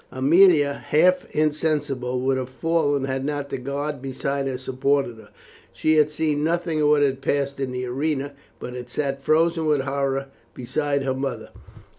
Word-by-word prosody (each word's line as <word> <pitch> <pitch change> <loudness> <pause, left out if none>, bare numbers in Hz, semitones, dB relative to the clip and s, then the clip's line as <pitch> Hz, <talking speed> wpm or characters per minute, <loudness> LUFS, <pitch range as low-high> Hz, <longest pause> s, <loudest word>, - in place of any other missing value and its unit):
Aemilia, 145 +1 +4
half 180 +4 +3
insensible, 150 -5 -1
would 135 +1 +1
have 130 -1 -5
fallen 145 0 0
had 135 0 -2
not 145 0 -3
the - - -3
guard 140 +2 -4
beside 135 +1 -2
her 130 -1 -2
supported 130 -1 0
her. 110 -1 -15 0.4
She 155 0 +2
had 150 -1 +4
seen 150 -1 -1
nothing 165 -1 0
of 150 - +3
what 150 -1 +4
had 135 -1 0
passed 140 0 -1
in 135 -1 -2
the 125 0 -3
arena, 140 +2 -2 0.2
but 125 - -7
had 125 -1 -7
sat 135 +1 -2
frozen 165 +2 +2
with 150 -3 +2
horror 135 0 -2 0.3
beside 140 +3 -1
her 135 -1 0
mother. 135 +1 -4
140 Hz, 170 wpm, -23 LUFS, 135-150 Hz, 0.4 s, Aemilia